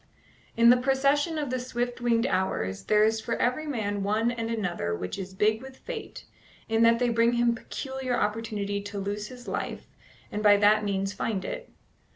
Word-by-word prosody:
In 235 +1 +7
the 250 - +6
procession 275 +5 +2
of 290 -4 -2
the 255 - -1
swift 245 -1 -3
winged 235 -1 +2
hours 95 - -1
there 210 0 +4
is 220 0 +2
for 230 - -2
every 280 +6 0
man 205 -7 -2
one 215 +4 +1
and 230 -1 -3
another 175 - -2
which 90 - -5
is 190 0 -7
big 215 +3 +2
with 265 0 -11
fate, 470 -3 -7 0.4
in 225 0 +1
that 230 0 +6
they 245 0 +1
bring 230 +1 +3
him 240 0 +3
peculiar 260 +1 -4
opportunity 210 -1 -2
to 205 0 -7
lose 205 +1 -3
his 245 0 -12
life, - - -4 0.5
and 210 - -3
by 205 -1 +6
that 210 +1 +4
means 195 -1 -1
find 195 -1 -2
it. - - -6
225 Hz, 190 wpm, -27 LUFS, 205-245 Hz, 0.5 s, In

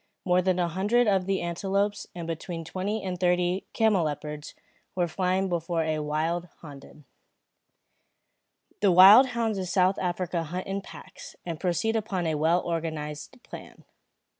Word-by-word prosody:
More 180 -1 +3
than 185 0 +1
a 175 -1 +1
hundred 205 +8 +1
of 195 -3 +1
the 195 -1 0
antelopes, 195 +4 -1
and 170 -1 -6
between 165 0 -5
twenty 200 +5 -3
and 180 -2 -4
thirty 180 +1 +1
camelopards 155 -8 -1 0.4
were 175 -2 +1
flying 185 +3 0
before 170 -1 -1
a 160 - -1
few 155 - -2
wilde 160 +4 -2
honden. 145 -1 -13 1.7
The 200 -2 +3
wild 195 +9 +9
hounds 230 -4 -2
of 185 -2 -4
South 185 +1 +2
Africa 175 -1 -2
hunt 175 +3 -5
in 195 +1 -3
packs, - - -12
and 165 -3 -5
proceed 195 +5 0
upon 200 -5 -2
a 160 - 0
well 160 +4 +1
organised 160 - -5
plan. - - -12
180 Hz, 150 wpm, -27 LUFS, 165-195 Hz, 1.7 s, wild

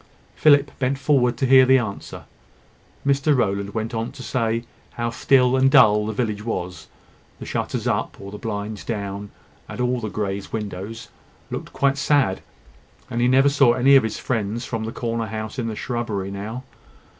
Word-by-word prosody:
Philip 145 -2 +4
bent 135 +1 0
forward 130 -4 +2
to 135 - 0
hear 130 0 +7
the 130 +1 +5
answer. 110 -6 -5 0.8
Mr 140 +1 +2
Rowland 100 -2 -1
went 110 +1 -3
on 115 +1 -3
to 130 - -9
say 115 -2 -1 0.3
how 120 0 -2
still 125 +1 +3
and 130 0 +4
dull 105 -7 +5
the - - -1
village 105 -2 -2
was. 90 -7 -5 0.5
The - - -9
shutters - - -3
up, - - -1
or 100 0 -9
the 105 - -8
blinds 105 -1 -5
down, 100 -2 -4 0.4
at - - -7
all 125 0 0
the 110 -2 -4
Greys' 100 -2 -4
windows, 105 +1 -6 0.4
looked - - -5
quite 140 0 +1
sad; 140 -10 +2 0.7
and 120 - -1
he 120 - +3
never 135 +2 +5
saw 140 -4 +4
any 135 +3 +5
of 135 - +7
his 110 -1 -3
friends 115 0 -2
from 115 -2 -4
the 110 - -4
corner 115 -2 -3
house 110 +3 -5
in 115 - -2
the 110 - -4
shrubbery 110 -5 -3
now. 110 +6 -6
115 Hz, 180 wpm, -22 LUFS, 105-130 Hz, 0.8 s, hear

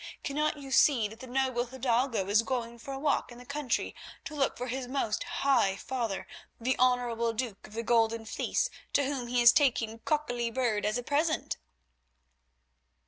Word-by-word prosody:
Cannot 300 +2 0
you 275 -2 -9
see 260 -5 +5
that 220 +1 -12
the 260 - -9
noble 255 -1 0
hidalgo 245 -4 0
is 205 +2 +4
going 235 -1 -3
for 275 - -8
a 270 - -4
walk 285 -2 0
in 240 - -11
the 250 - -12
country 280 -3 -2 0.3
to 305 - -6
look 280 -3 0
for 245 - -3
his 255 0 -3
most 245 -5 -1
high 240 -9 +2
father, 230 -3 -3 0.3
the 255 +3 +1
honourable 240 -2 +2
duke 225 -3 -4
of 210 - -16
the 230 +1 -3
Golden 230 -1 +2
Fleece, 220 - -1 0.2
to 285 - +4
whom 265 -3 -2
he 245 0 +2
is 235 0 +9
taking 240 -6 +3
a 225 - -10
cockolly 245 -5 -1
bird 225 -4 0
as 215 +3 0
a 245 - -4
present?" 310 +4 0
245 Hz, 185 wpm, -30 LUFS, 230-270 Hz, 0.3 s, is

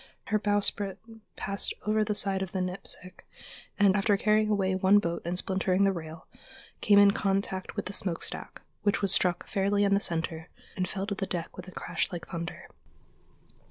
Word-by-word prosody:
Her 215 +1 +2
bowsprit 205 -1 +1 0.4
passed 200 0 -3
over 215 0 +2
the 210 0 -1
side 195 -2 0
of 190 -1 -4
the 190 - -1
Nipsic, 185 0 -4 0.5
and, 200 -2 +5
after 200 0 +3
carrying 215 +1 +2
away 195 -3 +1
one 190 +2 +5
boat 170 -4 -1
and 175 +1 -2
splintering 190 0 +1
the 195 - +4
rail, 160 -2 -7 0.6
came 205 -1 +5
in 200 0 +8
contact 195 -2 -2
with - - -3
the 195 - -5
smokestack, 180 -4 -2 0.2
which 205 0 +1
was 195 -1 +4
struck 180 -1 +2
fairly 200 0 +1
in 200 -1 +3
the 200 - +4
center 165 -3 -3 0.3
and 185 -1 -2
fell 195 0 -3
to 200 - -2
the 195 -1 -3
deck 170 -2 -4
with 185 0 -9
a - - -9
crash - - -2
like 175 -2 -6
thunder. 170 -1 -6
195 Hz, 185 wpm, -29 LUFS, 185-205 Hz, 0.6 s, in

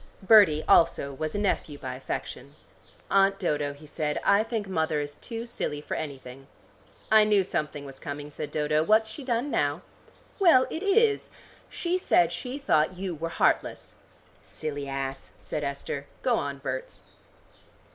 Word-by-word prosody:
Bertie 190 -8 +6
also 140 -4 +4
was 155 +5 -4
a - - 0
nephew 190 -7 -1
by 130 -2 -6
affection. 130 +1 -6 0.6
"Aunt 195 0 +4
Dodo," 150 -6 -1
he 145 +2 -15
said, 150 0 -2
"I 200 - +5
think 225 -2 -3
mother 160 -4 0
is 145 0 -4
too 230 +8 -7
silly 150 -10 -4
for 150 - -6
anything." 135 -3 -7 0.6
"I 220 -1 +7
knew 210 -2 +3
something 150 -5 -3
was 135 -1 -11
coming," 145 +1 -6
said 150 0 -6
Dodo; 150 0 +1
"what's 215 +6 +3
she 280 - -7
done 250 +2 -1
now?" 145 +4 0 0.6
"Well, 330 -10 +6
it 320 - -4
is. 425 +2 +2 0.4
She 355 +1 -1
said 175 - +3
she 250 +10 -5
thought 185 - +1
you 185 -1 -3
were 165 +1 -4
heartless." - - 0 0.5
"Silly 145 -2 -6
ass," 135 0 -5
said 150 - -4
Esther. 140 0 -4 0.2
"Go 245 -2 +3
on, 140 0 -4
Berts." 130 -1 -5
155 Hz, 155 wpm, -27 LUFS, 145-215 Hz, 0.6 s, I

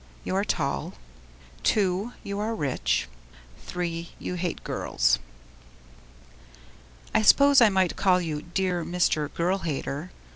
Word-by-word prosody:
You - - -2
are 195 - +2
tall. 140 -8 -2 0.8
II. 195 +2 +1
You 200 0 -4
are 220 +2 -1
rich. 65 - 0 0.7
III. 170 -1 -3
You - - -5
hate 175 -1 -3
girls. - - +1 1.9
I - - +4
suppose 280 +4 +6
I 230 - +7
might 190 -3 +1
call 185 -2 +3
you 155 -4 -3
Dear 180 0 -1
Mr. 155 -4 0
Girl 180 +3 0
Hater. 155 0 -4
180 Hz, 120 wpm, -26 LUFS, 155-195 Hz, 1.9 s, I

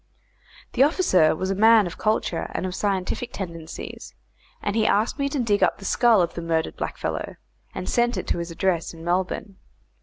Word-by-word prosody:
The 250 - +1
officer 270 - +4
was 190 +4 -2
a - - +2
man 220 +1 +6
of 175 - -7
culture 215 -5 0
and - - -1
of 185 - -3
scientific 200 +5 -2
tendencies, 165 -4 -7 0.4
and 205 0 -2
he 220 -1 +2
asked 220 +7 +1
me 280 0 0
to 285 - -3
dig 210 -4 +1
up - - +3
the 195 - -11
skull 225 -2 +4
of 170 - -3
the 170 - -5
murdered 165 -1 -1
blackfellow, - - -4 0.4
and 185 - -5
sent 240 0 +1
it - - -3
to - - 0
his 170 0 -4
address 170 -1 -1
in 165 - -11
Melbourne. 185 +3 -2
190 Hz, 190 wpm, -24 LUFS, 175-225 Hz, 0.4 s, man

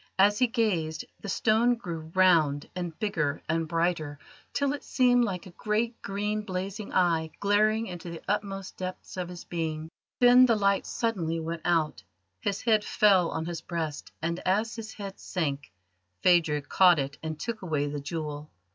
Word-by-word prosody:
As 205 +2 +4
he 250 - +4
gazed, 180 -10 0
the 200 - -7
stone 225 +5 +3
grew 165 -8 -7
round 165 -6 +4
and 175 -3 -4
bigger 155 -10 -1
and 165 0 0
brighter, 165 -3 -1 0.3
till 280 -1 0
it 290 - -6
seemed 245 -2 +3
like 190 -3 -4
a 185 - -11
great 220 +5 -1
green 210 +2 -2
blazing 195 +1 -5
eye 165 -3 +2
glaring 215 +2 +3
into 175 -3 -7
the 170 -1 -7
utmost 195 -2 -3
depths 185 0 -6
of 180 -2 -4
his 175 -1 -8
being. 160 -2 -4 0.3
Then 245 +1 +7
the 230 - +4
light 200 -1 +1
suddenly 175 -8 -1
went 165 +1 -4
out, 165 -3 +1 0.4
his 200 - -2
head 220 -2 +3
fell 195 -6 +4
on 160 0 -3
his 170 -1 -4
breast, 160 -4 -4
and 170 +2 -1
as 215 +4 0
his 220 -1 -7
hand 200 -2 -8
sank, 145 - -3 0.5
Phadrig 160 -5 +3
caught 180 -3 +6
it 140 0 -3
and 155 -1 -5
took 230 -1 -4
away 155 -6 -1
the 145 0 -3
jewel. 150 0 -5
180 Hz, 170 wpm, -28 LUFS, 160-210 Hz, 0.5 s, Then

